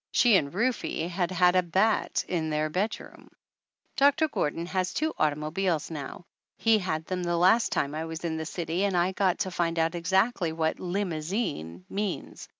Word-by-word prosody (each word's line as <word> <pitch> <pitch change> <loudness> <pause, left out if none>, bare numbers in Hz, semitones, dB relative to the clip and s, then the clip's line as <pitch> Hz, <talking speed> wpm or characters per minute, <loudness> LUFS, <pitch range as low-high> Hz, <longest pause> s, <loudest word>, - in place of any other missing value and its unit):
She 240 -4 +5
and 140 -6 +2
Rufe 235 +7 0 0.3
had 175 0 0
had 180 0 +3
a 185 - +5
bat 190 +5 +1
in 160 -3 -1
their 155 0 -1
bedroom! 205 +6 -4 0.7
Doctor 285 +3 +4
Gordon 165 - -2
has 185 +1 -2
two 315 +1 0
automobiles 155 +3 0
now. 150 +3 -7 0.3
He 225 -1 +4
had 160 -4 -2
them 185 0 -3
the 175 -1 0
last 190 +7 +4
time 140 +1 0
I 160 +1 -3
was 160 +1 -6
in 160 -1 -2
the 160 -1 -4
city 170 +3 -2
and 195 -3 +1
I 175 +2 +2
got 190 -2 +1
to 190 -2 -1
find 170 -1 -1
out 165 +1 +1
exactly 185 +1 +1
what 160 -1 -1
"limousine" 175 - -3
means. 200 -2 -4
175 Hz, 175 wpm, -27 LUFS, 160-195 Hz, 0.7 s, She